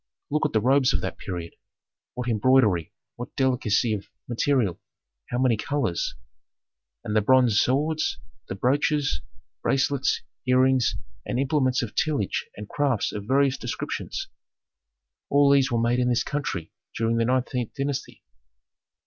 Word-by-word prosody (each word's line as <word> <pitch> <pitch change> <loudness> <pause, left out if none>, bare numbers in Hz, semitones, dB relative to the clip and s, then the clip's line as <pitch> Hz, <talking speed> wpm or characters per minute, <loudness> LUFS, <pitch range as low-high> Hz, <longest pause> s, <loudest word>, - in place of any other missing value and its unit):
Look 150 +1 +2
at - - -13
the 110 - +3
robes 130 +2 +3
of - - 0
that - - -5
period: 85 -3 -6 0.6
what 125 0 -4
embroidery, 110 -7 +3 0.3
what 120 - -8
delicacy 120 -4 +1
of 100 -2 -5 0.2
material, 120 -5 +1 0.5
how 120 - -2
many 125 -2 +3
colors! 135 -8 -1 0.9
And 105 - -3
the 110 - +4
bronze 125 -1 +4
swords, 150 +4 0 0.3
the 95 - -4
brooches, 140 - +1 0.4
bracelets, 135 0 +1 0.2
earrings 130 -1 +3 0.3
and - - -3
implements 130 -2 +1
of 110 - -5
tillage 145 -11 -1
and 105 0 -7
crafts 135 -5 0
of 105 -1 -6
various 135 +1 +2
descriptions. 120 - -4 1.0
All 140 0 +5
these 135 -2 +4
were 120 - +1
made 120 +2 +1
in 125 0 +2
this 120 - +2
country 95 - -3 0.3
during 115 +1 +1
the 115 - +2
nineteenth 125 -1 -1
dynasty." 140 -1 -4
125 Hz, 140 wpm, -25 LUFS, 110-140 Hz, 1.0 s, All